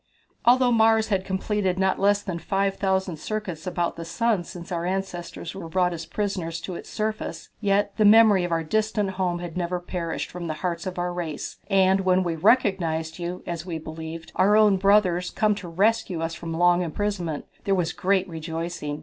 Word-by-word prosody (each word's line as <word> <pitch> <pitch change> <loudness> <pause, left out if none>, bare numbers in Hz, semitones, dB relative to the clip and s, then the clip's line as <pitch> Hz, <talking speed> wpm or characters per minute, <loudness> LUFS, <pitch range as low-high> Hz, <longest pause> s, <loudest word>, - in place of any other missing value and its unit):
"Although 250 +1 +5
Mars 220 -1 +4
had 195 -3 +1
completed 190 0 -1
not 190 0 +1
less 205 +1 +3
than 180 -4 -4
five 195 +2 0
thousand 190 -3 0
circuits 185 -2 -5
about 175 -1 -1
the 165 - -5
sun 200 +3 0
since 170 +1 -10
our 170 -1 -2
ancestors 185 -1 -4
were 185 -4 -7
brought 180 0 +1
as 165 -1 -6
prisoners 185 -6 -3
to 185 - -5
its - - -8
surface, 215 -6 -4
yet 200 -1 +1
the 215 - +3
memory 210 -2 +7
of 175 - -3
our 165 -1 +1
distant 215 +2 0
home 185 -2 -1
had 175 -2 -7
never 180 0 -1
perished 175 -2 -4
from 175 -1 -6
the 155 - -3
hearts 175 +1 -2
of 185 - -5
our 175 0 -1
race, 165 -4 -5
and 190 -1 +4
when 185 0 +3
we 170 -2 -1
recognized 170 -6 +2
you, 175 +1 -4
as 170 -2 -4
we 175 -2 -4
believed, 160 +1 -8
our 205 +3 +5
own 210 -3 +5
brothers, 185 -2 +3
come 215 -1 +2
to 200 -3 -7
rescue 190 0 +1
us 165 0 -2
from 165 0 -6
long 175 +1 +4
imprisonment, 175 -2 -2 0.2
there 195 - +2
was 175 -2 0
great 190 0 +1
rejoicing. 165 -2 -4
180 Hz, 190 wpm, -25 LUFS, 170-200 Hz, 0.2 s, memory